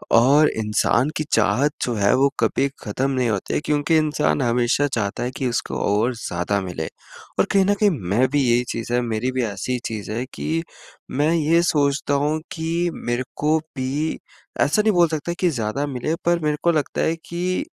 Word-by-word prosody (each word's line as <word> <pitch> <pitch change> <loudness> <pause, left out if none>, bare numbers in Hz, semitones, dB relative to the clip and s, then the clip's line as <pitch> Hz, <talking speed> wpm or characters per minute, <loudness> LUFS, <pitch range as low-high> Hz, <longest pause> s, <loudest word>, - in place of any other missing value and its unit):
और 140 +6 +6
इंसान 110 +5 +1
की 155 - -1
चाहत 115 +7 +3
जो 120 - -1
है, 100 -1 +3
वो 140 +2 +4
कभी 140 - +2 0.2
ख़त्म 130 +6 -1
नहीं 125 -3 +1
होती 100 -3 -2
है - - +2
क्योंकि 150 +2 +2
इंसान 150 -2 +1
हमेशा 120 +4 +2
चाहता 100 -1 -2
है 125 - -2
कि 130 - -1
उसको 120 - -2
और 115 +5 +2
ज़्यादा 100 -2 -2
मिले 85 -4 -4 0.5
और - - +5
कहीं 195 -1 +4
न 205 - +3
कहीं 210 - +6 0.2
मैं 125 +6 +3
भी 145 +1 +1
यही 120 +1 +3
चीज़ 115 +1 -5
है, 125 - +3
मेरी 115 +1 -1
भी 130 -1 -1
ऐसी 110 +4 -2
चीज़ 105 -2 -4
है 120 +4 -2
कि 165 +1 -2 0.5
मैं 145 +4 +1
ये 165 +1 +3
सोचता 145 -3 +1
हूँ 155 +1 0
कि 170 +1 -1
मेरे 120 +1 -2
को 155 +2 +2
भी, 150 0 -3 0.4
ऐसा 155 +9 +3
नहीं 215 -1 +2
बोल 175 -1 +5
सकता 160 +2 -3
कि 180 - +3
ज़्यादा 120 -1 -2
मिले, 140 +4 -2
पर 170 0 +3
मेरे 150 -1 +1
को 170 - +4
लगता 155 -4 -1
है 160 - +1
कि 180 - -1
140 Hz, 195 wpm, -22 LUFS, 115-155 Hz, 0.5 s, और